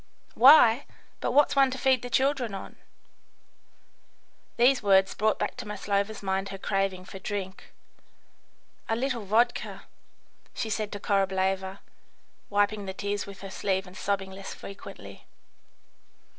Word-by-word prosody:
"Why? 255 -1 +7 0.3
but - - -1
what's 290 0 +4
one 275 -1 +5
to 260 - -5
feed 260 -1 +2
the 245 - -6
children 260 -4 +1
on?" 195 - -8 1.8
These 250 +2 +4
words 195 -2 +4
brought 215 +1 +1
back - - -2
to 245 -4 -7
Maslova's 205 +1 -2
mind 195 0 -1
her 195 - -6
craving 195 -1 -1
for 195 - -9
drink. 190 -1 -6 1.2
"A 225 - +2
little 245 -1 -2
vodka," 225 +5 +1 0.7
she 220 - -3
said 215 0 -2
to 205 - -5
Korableva, 190 -1 0 0.7
wiping 205 0 +1
the 190 - -5
tears 205 0 -3
with 200 -1 -11
her 195 -1 -8
sleeve 190 -1 -1
and 180 0 -13
sobbing 195 -1 -2
less 195 0 -8
frequently. 195 0 -11
200 Hz, 135 wpm, -27 LUFS, 195-230 Hz, 1.8 s, Why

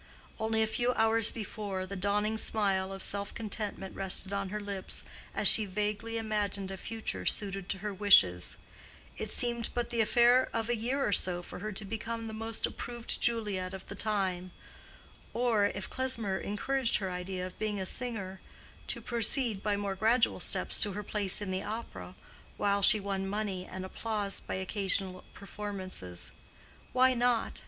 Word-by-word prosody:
Only 220 0 +1
a - - +3
few 240 +3 0
hours 225 -1 +4
before, 205 -3 -5
the 200 +1 -7
dawning 205 +3 0
smile 195 -4 +1
of 195 0 -3
self 200 0 -1
contentment 210 -3 -5
rested 195 0 +2
on 200 -1 -2
her 210 +2 -4
lips 200 -2 -3 0.3
as - - +4
she 215 - +10
vaguely 210 +3 -2
imagined 205 -3 -2
a 190 - -6
future 225 +4 -5
suited 195 -2 -1
to 195 - 0
her 210 - -2
wishes: 100 - +4 0.6
it - - -4
seemed 235 -1 +3
but 240 0 -1
the 235 -1 +1
affair 240 +3 +4
of 230 0 -2
a 240 - +2
year 255 +5 -1
or - - 0
so 180 -2 +2
for - - -9
her 215 +3 -4
to 200 +2 -2
become 225 +2 -5
the 220 - -6
most 225 +1 -2
approved 240 -1 -4
Juliet 205 -6 0
of 190 - -10
the - - -8
time: 190 -4 -1 0.9
or, 230 -4 +2
if 200 -1 -5
Klesmer 230 -7 -1
encouraged 250 +4 -1
her 190 -2 -4
idea 180 0 -4
of 185 - -10
being 210 -2 -2
a 190 - -3
singer, 195 -5 -3 0.5
to - - -1
proceed 235 -2 0
by 205 -1 0
more 200 -1 -2
gradual 225 +5 +2
steps - - 0
to 205 -2 0
her 210 +2 -5
place 205 -1 -1
in 190 - -4
the 185 0 -2
opera, 200 - -7 0.4
while 200 0 +1
she 210 +2 +7
won 195 -1 -3
money 195 -2 -3
and 185 0 -6
applause 205 0 -3
by - - -5
occasional 190 -1 +3
performances. 190 - -6 0.6
Why 255 0 +4
not? 245 -1 0
205 Hz, 170 wpm, -30 LUFS, 190-225 Hz, 0.9 s, she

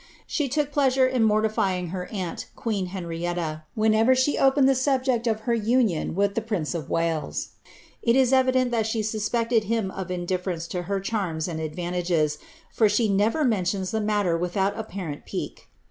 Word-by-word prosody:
She 295 -4 -1
took 295 +2 0
pleasure 270 -2 +3
in 255 -2 +1
mor 215 0 +3
tifying 185 -5 0
her 180 -1 -4
aunt, 185 -5 -5
queen 205 -5 -2
Henrietui, 170 -3 -3
whenever 220 +3 +4
she 260 +3 +2
opened 270 0 +4
the 270 - +5
subject 260 -2 +1
of 220 -1 0
her 235 +1 0
union 225 -8 +1
with 200 +1 +1
the 230 - -1
prince 205 -9 -2
of 160 -5 -5
Wales; 165 -2 -1 0.5
it 235 0 +3
is 265 -1 +4
evident 255 -1 +3
that 225 -2 +1
she 220 0 -1
suspected 220 +1 0
bin 225 -4 0
of 190 -2 -5
indiflerence 180 -1 -3
to 180 - -2
her 200 -1 0
cliarms 190 -6 -2
and 165 -2 -4
advantages, 170 -1 -1 0.3
for 220 -2 +3
she 215 +1 +2
never 210 +10 +2
mentions 190 -4 0
the 220 -1 0
matter 205 -5 +1
without 180 +3 0
apparent 185 -9 -6
pique. - - -6
210 Hz, 175 wpm, -25 LUFS, 180-235 Hz, 0.5 s, the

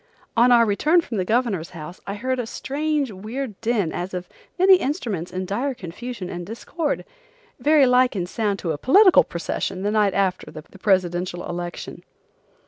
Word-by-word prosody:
On 240 +1 +5
our 235 -1 +6
return 300 - +3
from 235 -9 -5
the 185 - 0
Governor's 215 -7 0
House, 160 +3 -9
I 200 - -3
heard 255 +4 -2
a 240 - -3
strange, 290 +1 -2
weird 215 +3 -6
din 220 -8 0
as 185 +1 -4
of 180 0 -5 0.3
many 375 +1 +7
instruments 230 - -3
in 185 0 -3
dire 250 +8 -2
confusion 195 +2 -7
and 175 -1 -6
discord, 285 - -3 0.5
very 295 -2 +5
like 250 -1 +3
in 180 -3 -1
sound 205 +1 -1
to 170 - -1
a 145 - -4
political 375 - +6
procession 180 +2 -4
the 205 - 0
night 210 -3 +2
after 190 -2 0
the 155 - -9 0.2
presidential 180 -2 0
election. 175 0 -6
210 Hz, 170 wpm, -23 LUFS, 180-255 Hz, 0.5 s, many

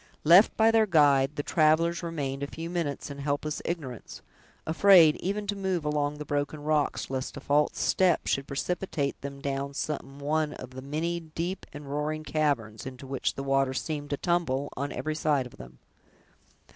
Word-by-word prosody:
Left 175 +7 +6
by 225 0 +5
their 225 -1 +4
guide, 145 -5 +4
the 145 - -2
travelers 165 +2 +2
remained 145 -5 -3
a 140 - -2
few 165 +3 -6
minutes 155 -4 -3
in 140 - -8
helpless 145 +1 -2
ignorance, 145 -9 -6 0.4
afraid 165 -1 +6
even 205 +3 -2
to 205 0 -2
move 190 -5 -2
along 150 0 0
the 150 - -6
broken 145 +1 -2
rocks, 150 -3 0
lest 130 +1 -3
a - - -4
false 145 +2 +1
step 185 -3 +2
should 135 0 -1
precipitate 150 -1 -2
them 140 0 -7
down 140 0 -3
some 140 -2 -4
one 150 +1 0
of 130 - -9
the 130 0 -8
many 160 +5 -2
deep 170 +3 -5
and 145 0 -9
roaring 150 +2 -3
caverns, 135 -9 -1
into 130 +1 -9
which 135 0 -2
the 135 - -4
water 135 -1 +1
seemed 145 0 -3
to 145 - -1
tumble, 145 -6 0
on 140 +2 -3
every 155 - -3
side 150 -4 +1
of 125 - -12
them. 65 0 -12
150 Hz, 180 wpm, -28 LUFS, 140-165 Hz, 0.4 s, Left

